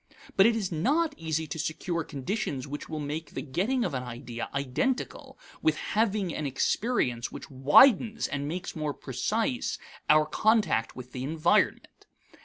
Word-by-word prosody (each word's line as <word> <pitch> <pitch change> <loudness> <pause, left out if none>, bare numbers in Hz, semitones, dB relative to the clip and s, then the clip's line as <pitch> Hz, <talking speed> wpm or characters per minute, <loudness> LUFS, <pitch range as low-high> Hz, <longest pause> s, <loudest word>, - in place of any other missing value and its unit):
But 195 +2 +7
it 230 - +3
is 200 -5 -2
not 295 - +1
easy 160 -1 -2
to 155 +2 -6
secure 165 +2 -2
conditions 145 - -3
which 145 +1 -6
will 155 - -4
make 150 +2 -4
the - - -2
getting 210 - 0
of 170 - -2
an 130 - -1
idea 120 -1 -6
identical 140 - -2 0.2
with 155 -1 +2
having 210 -5 0
an 150 - -2
experience 135 - 0
which - - -9
widens 215 - +5
and 140 0 -3
makes 175 +4 -4
more 150 -2 -2
precise 220 - -1 0.3
our 155 0 +6
contact 210 - +2
with 125 0 -9
the 130 0 -5
environment. 165 +8 +1
160 Hz, 155 wpm, -28 LUFS, 140-215 Hz, 0.3 s, But